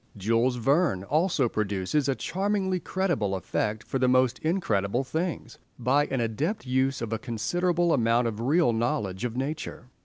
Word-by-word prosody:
Jules 115 +5 +1
Verne 135 - +2
also 150 - +1
produces 105 +7 -1
a 135 - +1
charmingly 190 +2 -1
credible 170 - -1
effect 105 +4 -2
for 135 - -3
the 130 - +3
most 130 0 +3
incredible 125 - 0
things 160 -4 -4 0.2
by 135 +4 +2
an 135 - -2
adept 135 - -2
use 130 0 0
of 115 -1 -3
a 110 - -2
considerable 170 +10 0
amount 120 -1 +2
of 110 -2 -4
real 140 0 +3
knowledge 115 -4 -1
of 120 0 -4
nature. 135 -2 -4
130 Hz, 155 wpm, -27 LUFS, 115-160 Hz, 0.2 s, the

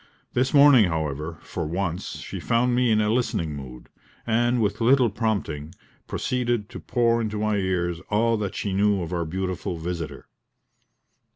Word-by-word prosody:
This 130 +2 +1
morning, 140 -6 +7
however, 80 -1 -3
for 85 -4 -4
once, 85 +1 -3
she - - -7
found 120 +1 +1
me 125 0 +2
in 110 -1 +3
a 105 +1 +1
listening 85 -10 -1
mood, 65 -3 -9 0.4
and 120 +2 +2
with 105 0 0
little 125 -1 +4
prompting, 95 -8 -2 0.3
proceeded 120 -4 -1
to - - -8
pour 115 -1 +1
into 110 -1 -3
my 105 0 0
ears 90 -3 -1
all 115 +2 +2
that 100 -2 -3
she 100 - -2
knew 100 -1 +2
of 85 - -5
our 85 -1 -1
beautiful 90 +1 -3
visitor. 85 -1 -5
105 Hz, 160 wpm, -25 LUFS, 85-115 Hz, 0.4 s, morning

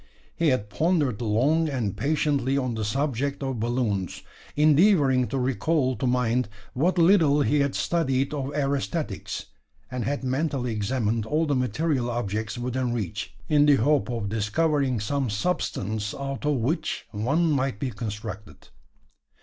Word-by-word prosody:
He 165 - +1
had 105 -7 +1
pondered 150 - +1
long 135 +9 +2
and 120 -8 -2
patiently 140 -3 +1
on 130 -3 -1
the 110 -1 -3
subject 140 +4 -1
of 135 -3 -2
balloons 110 -5 -1 0.3
endeavouring 150 - +4
to 135 - -3
recall 130 +2 +1
to 130 - -1
mind 125 -1 +1 0.2
what 170 +8 +1
little 165 -5 +5
he 145 +2 +2
had 140 -1 +1
studied 135 -5 0
of 140 -1 -3
aerostatics 140 - -2 0.5
and 125 -2 -2
had 140 +5 -2
mentally 130 -1 -1
examined 110 0 -1
all 155 +5 +1
the 145 - 0
material 125 +1 0
objects 110 -1 -3
within 125 0 -1
reach, 105 -8 -4
in 150 -1 +4
the 145 - +7
hope 140 +3 +2
of 115 -4 -2
discovering 130 +5 +1
some 135 +4 -1
substance 105 - -2
out 135 +1 -4
of 150 - +2
which 135 +7 -1
one 140 +11 +1
might 135 -6 0
be 130 0 -2
constructed. 105 -2 -7
130 Hz, 145 wpm, -25 LUFS, 115-145 Hz, 0.5 s, the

